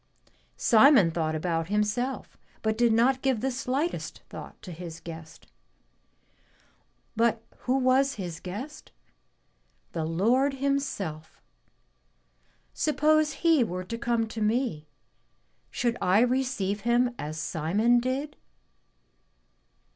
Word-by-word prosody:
Simon 225 Hz, -, +6 dB
thought 160 Hz, -1 st, -1 dB
about 165 Hz, 0 st, -1 dB
himself, 210 Hz, +6 st, -1 dB, 0.3 s
but 220 Hz, 0 st, +1 dB
did 235 Hz, 0 st, +3 dB
not 250 Hz, +4 st, +3 dB
give 265 Hz, -4 st, +1 dB
the 265 Hz, +4 st, -1 dB
slightest 270 Hz, +6 st, -3 dB
thought -, -, -10 dB
to 185 Hz, -, -8 dB
his 165 Hz, -1 st, -8 dB
guest. 165 Hz, -1 st, -10 dB, 1.7 s
But 230 Hz, 0 st, +1 dB, 0.3 s
who 260 Hz, -, +4 dB
was 270 Hz, +1 st, +3 dB
his 175 Hz, -5 st, -6 dB
guest? 230 Hz, +12 st, -8 dB, 1.0 s
The 160 Hz, -, -3 dB
Lord 235 Hz, -, +2 dB
Himself. 265 Hz, -, -3 dB, 1.3 s
Suppose 305 Hz, 0 st, +2 dB
He 320 Hz, -6 st, +5 dB
were 185 Hz, -4 st, -4 dB
to 230 Hz, +5 st, -5 dB
come 235 Hz, -1 st, 0 dB
to 220 Hz, 0 st, -6 dB
me, 215 Hz, -, 0 dB, 0.8 s
should 240 Hz, -1 st, -1 dB
I 190 Hz, +4 st, +4 dB
receive 245 Hz, -6 st, 0 dB
Him 240 Hz, +2 st, +2 dB
as 155 Hz, +1 st, -5 dB
Simon 195 Hz, +10 st, +1 dB
did?" 265 Hz, +4 st, -3 dB
230 Hz, 110 wpm, -27 LUFS, 180-265 Hz, 1.7 s, Simon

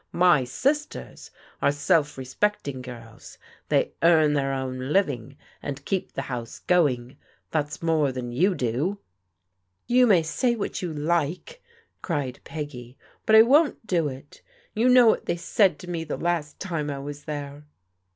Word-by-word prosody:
My 175 Hz, -7 st, +4 dB
sisters 280 Hz, -, -2 dB, 0.3 s
are -, -, +4 dB
self 145 Hz, +1 st, +1 dB
respecting 135 Hz, 0 st, -2 dB
girls. 115 Hz, -3 st, -11 dB, 0.3 s
They -, -, +2 dB
earn 160 Hz, -3 st, +5 dB
their 135 Hz, -2 st, 0 dB
own 130 Hz, 0 st, -4 dB
living 140 Hz, -, 0 dB, 0.2 s
and 140 Hz, -1 st, -6 dB
keep 190 Hz, -2 st, -2 dB
the 135 Hz, -, -3 dB
house 120 Hz, -4 st, -6 dB
going. 135 Hz, -7 st, +1 dB, 0.3 s
That's 150 Hz, 0 st, -2 dB
more 155 Hz, -4 st, +2 dB
than 125 Hz, -1 st, -5 dB
you 180 Hz, +10 st, +2 dB
do." 135 Hz, -, -1 dB, 0.4 s
" 90 Hz, 0 st, -51 dB
You 250 Hz, 0 st, +6 dB
may 185 Hz, -7 st, +5 dB
say 235 Hz, +10 st, 0 dB
what 210 Hz, -, -4 dB
you 180 Hz, -3 st, -3 dB
like," 170 Hz, -, -2 dB, 0.4 s
cried 145 Hz, -8 st, -3 dB
Peggy, 135 Hz, -5 st, -7 dB
" -, -, -34 dB
but 220 Hz, -, +6 dB
I 220 Hz, -, +10 dB
won't 285 Hz, +1 st, +3 dB
do 175 Hz, -7 st, +1 dB
it. 135 Hz, +1 st, -10 dB, 0.3 s
You 230 Hz, +4 st, +2 dB
know 250 Hz, -1 st, +7 dB
what 225 Hz, -, +2 dB
they -, -, 0 dB
said 195 Hz, +2 st, +2 dB
to 180 Hz, -, -10 dB
me 170 Hz, -2 st, -3 dB
the 150 Hz, -, -4 dB
last 165 Hz, -4 st, -2 dB
time 165 Hz, -6 st, -3 dB
I 140 Hz, -, -3 dB
was 145 Hz, +1 st, -8 dB
there." 145 Hz, 0 st, -6 dB
150 Hz, 160 wpm, -25 LUFS, 135-180 Hz, 0.4 s, I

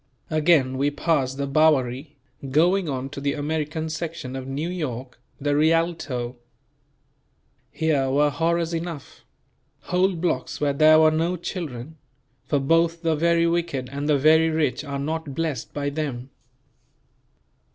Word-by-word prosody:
Again 150 Hz, -5 st, +3 dB
we 140 Hz, +1 st, +2 dB
passed 145 Hz, -3 st, 0 dB
the 140 Hz, -, -1 dB
Bowery, 140 Hz, -1 st, +1 dB, 0.3 s
going 170 Hz, +5 st, +2 dB
on 135 Hz, -1 st, -3 dB
to 140 Hz, -, -7 dB
the 140 Hz, 0 st, 0 dB
American 155 Hz, +1 st, -2 dB
section 160 Hz, -5 st, -5 dB
of 130 Hz, 0 st, -6 dB
New 140 Hz, +5 st, -3 dB
York, 130 Hz, -9 st, -5 dB, 0.2 s
the 145 Hz, 0 st, 0 dB
Rialto. 155 Hz, -6 st, 0 dB, 1.3 s
Here 145 Hz, -4 st, 0 dB
were 145 Hz, +2 st, +3 dB
horrors 165 Hz, +3 st, 0 dB
enough; 165 Hz, -4 st, -6 dB, 0.6 s
whole 185 Hz, +1 st, +1 dB
blocks 165 Hz, -2 st, -2 dB
where 145 Hz, -1 st, +1 dB
there 155 Hz, +2 st, +6 dB
were 155 Hz, 0 st, +5 dB
no 165 Hz, +3 st, 0 dB
children; 160 Hz, -5 st, -6 dB, 0.5 s
for 145 Hz, -, +1 dB
both 165 Hz, +4 st, +1 dB
the 165 Hz, -1 st, +2 dB
very 170 Hz, +2 st, +2 dB
wicked 170 Hz, -7 st, -1 dB
and 140 Hz, +2 st, -3 dB
the 150 Hz, -, +4 dB
very 160 Hz, +3 st, +5 dB
rich 155 Hz, -3 st, 0 dB
are 140 Hz, -2 st, -4 dB
not 155 Hz, 0 st, -4 dB
blessed 155 Hz, -7 st, -3 dB
by 145 Hz, -1 st, -3 dB
them. 140 Hz, -4 st, -4 dB
155 Hz, 140 wpm, -24 LUFS, 140-165 Hz, 1.3 s, there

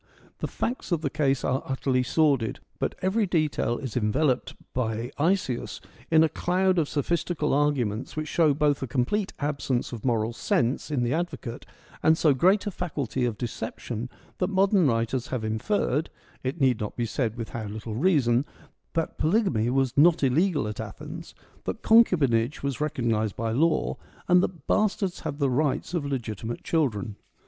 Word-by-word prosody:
The -, -, -2 dB
facts 245 Hz, -4 st, -3 dB
of 170 Hz, -3 st, +1 dB
the 140 Hz, -4 st, -2 dB
case 140 Hz, -4 st, +1 dB
are 130 Hz, +1 st, +1 dB
utterly 130 Hz, -1 st, 0 dB
sordid; 135 Hz, -4 st, +1 dB, 0.2 s
but -, -, -1 dB
every 200 Hz, +3 st, +2 dB
detail 155 Hz, -8 st, 0 dB
is 130 Hz, -6 st, -6 dB
enveloped 125 Hz, +4 st, +1 dB, 0.2 s
by 115 Hz, 0 st, -2 dB
Isaeus 165 Hz, -6 st, 0 dB, 0.3 s
in 160 Hz, -1 st, +6 dB
a -, -, +5 dB
cloud 185 Hz, +3 st, +1 dB
of 150 Hz, -, 0 dB
sophistical 155 Hz, +1 st, 0 dB
arguments 135 Hz, -6 st, 0 dB
which 155 Hz, 0 st, -3 dB
show 155 Hz, -3 st, +3 dB
both 145 Hz, -1 st, +2 dB
a 135 Hz, -, -2 dB
complete 135 Hz, -, 0 dB
absence 140 Hz, -4 st, -1 dB
of 115 Hz, -, -6 dB
moral 115 Hz, -2 st, +1 dB
sense 120 Hz, +4 st, 0 dB
in 140 Hz, -5 st, 0 dB
the 120 Hz, -, 0 dB
advocate 150 Hz, -8 st, -4 dB, 0.3 s
and 160 Hz, 0 st, +4 dB
so 155 Hz, -4 st, +4 dB
great 185 Hz, +10 st, +3 dB
a 205 Hz, -, -2 dB
faculty 140 Hz, -, -2 dB
of 115 Hz, -3 st, -2 dB
deception 120 Hz, 0 st, -5 dB, 0.3 s
that 180 Hz, -, +1 dB
modern 195 Hz, -3 st, +3 dB
writers 115 Hz, +2 st, 0 dB
have 125 Hz, -4 st, -3 dB
inferred 140 Hz, -, 0 dB, 0.2 s
— -, -, -29 dB
it 130 Hz, +1 st, -3 dB
need 130 Hz, -4 st, +3 dB
not 105 Hz, -, -4 dB
be 120 Hz, -, -1 dB
said 115 Hz, -1 st, -1 dB
with 115 Hz, -2 st, -5 dB
how 115 Hz, -2 st, -5 dB
little 110 Hz, +2 st, -6 dB
reason 130 Hz, -, +3 dB, 0.3 s
— -, -, -44 dB
that 165 Hz, -1 st, -2 dB
polygamy 155 Hz, -, +2 dB
was 130 Hz, -1 st, +1 dB
not 160 Hz, +2 st, +5 dB
illegal 145 Hz, -, +2 dB
at 105 Hz, -, -5 dB
Athens, -, -, -8 dB, 0.3 s
that -, -, -4 dB
concubinage 145 Hz, -, +4 dB
was 140 Hz, -1 st, -2 dB
recognised 115 Hz, -8 st, 0 dB
by 115 Hz, -1 st, -2 dB
law, 155 Hz, +8 st, +1 dB, 0.3 s
and 180 Hz, 0 st, +6 dB
that 185 Hz, -3 st, -3 dB
bastards 200 Hz, -3 st, +1 dB
had 140 Hz, -, -4 dB
the 140 Hz, -2 st, +2 dB
rights 145 Hz, +5 st, 0 dB
of 160 Hz, -5 st, -1 dB
legitimate 115 Hz, -4 st, -4 dB
children. 110 Hz, -, -1 dB
140 Hz, 170 wpm, -26 LUFS, 120-165 Hz, 0.3 s, in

